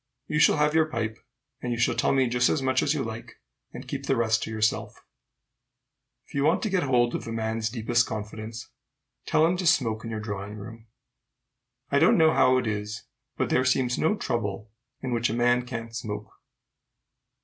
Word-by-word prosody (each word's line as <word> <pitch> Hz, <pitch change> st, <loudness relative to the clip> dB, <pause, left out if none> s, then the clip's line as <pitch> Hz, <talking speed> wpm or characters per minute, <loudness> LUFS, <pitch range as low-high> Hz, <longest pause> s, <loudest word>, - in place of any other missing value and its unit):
You 150 Hz, -, -1 dB
shall -, -, +5 dB
have 150 Hz, 0 st, +2 dB
your 160 Hz, -1 st, +3 dB
pipe, 110 Hz, -6 st, -3 dB, 0.4 s
and 125 Hz, -, -3 dB
you 120 Hz, -, -1 dB
shall 120 Hz, -, +2 dB
tell -, -, +1 dB
me 135 Hz, -2 st, +3 dB
just 125 Hz, +1 st, +2 dB
as -, -, +1 dB
much 130 Hz, -1 st, +1 dB
as 150 Hz, -, +1 dB
you 140 Hz, -, -1 dB
like, 110 Hz, 0 st, -8 dB, 0.3 s
and -, -, -9 dB
keep -, -, -5 dB
the 135 Hz, -, +2 dB
rest 115 Hz, -2 st, +1 dB
to -, -, -4 dB
yourself." 110 Hz, -1 st, -1 dB, 1.2 s
If -, -, -19 dB
you 140 Hz, -, 0 dB
want 165 Hz, +6 st, +2 dB
to 215 Hz, -, -1 dB
get 185 Hz, -2 st, +2 dB
hold 125 Hz, -4 st, +2 dB
of -, -, -4 dB
a -, -, -4 dB
man's 110 Hz, 0 st, -2 dB
deepest 120 Hz, 0 st, +1 dB
confidence, 110 Hz, +1 st, -6 dB, 0.6 s
tell 155 Hz, -, +4 dB
him 175 Hz, +2 st, +1 dB
to 180 Hz, -1 st, -1 dB
smoke 115 Hz, -8 st, +2 dB
in 115 Hz, -, -5 dB
your 110 Hz, -1 st, -4 dB
drawing 105 Hz, -1 st, -5 dB
room. 115 Hz, +2 st, -10 dB, 1.0 s
I -, -, +4 dB
don't -, -, +5 dB
know 160 Hz, 0 st, +5 dB
how 130 Hz, 0 st, +4 dB
it 125 Hz, -, 0 dB
is, 105 Hz, 0 st, -3 dB, 0.3 s
but -, -, -1 dB
there 130 Hz, -, +3 dB
seems 130 Hz, -1 st, +1 dB
no 160 Hz, +7 st, +2 dB
trouble 105 Hz, -, -3 dB, 0.3 s
in 130 Hz, -2 st, -2 dB
which 115 Hz, 0 st, +1 dB
a 110 Hz, -, -2 dB
man 120 Hz, +1 st, +2 dB
can't 115 Hz, -2 st, -6 dB
smoke. 105 Hz, -2 st, -5 dB
120 Hz, 200 wpm, -26 LUFS, 110-130 Hz, 1.2 s, shall